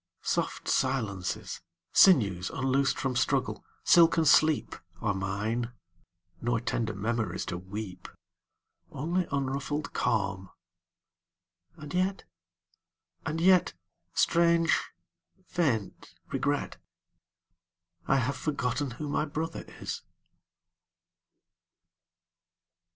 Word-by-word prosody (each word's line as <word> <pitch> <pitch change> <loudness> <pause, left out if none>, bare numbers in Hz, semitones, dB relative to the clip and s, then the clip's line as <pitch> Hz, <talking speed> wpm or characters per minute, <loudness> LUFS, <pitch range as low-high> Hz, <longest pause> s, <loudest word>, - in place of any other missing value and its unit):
Soft - - -1
silences, 110 -9 -1 0.3
Sinews 100 - +5
unloosed 135 +1 +1
from 135 -2 -1
struggle, 120 - 0 0.2
silken 165 -1 +6
sleep, 155 0 +5 0.3
27 - - -16
Are 105 - +3
mine; 105 +5 -2 0.7
nor 120 0 +1
tender 115 -1 -2
memories 110 -2 -2
to 90 - -4
weep. 95 -1 -7 0.8
Only 170 +6 -1
unruffled 140 +2 -2
calm; 100 -5 0 1.3
and 150 0 -9
yet 185 +2 0 0.5
— 90 - -42
and 160 - -2
yet 185 +1 +4 0.2
— - - -52
Strange, 170 0 +4 0.7
faint 130 - -2 0.2
regret - - -1 0.7
— 85 0 -39
I 135 - +4
have 135 +1 +1
forgotten 135 0 -1
who 150 - -4
my 145 - 0
brother 155 +2 -4 0.2
is! - - -4
130 Hz, 95 wpm, -29 LUFS, 100-150 Hz, 1.3 s, silken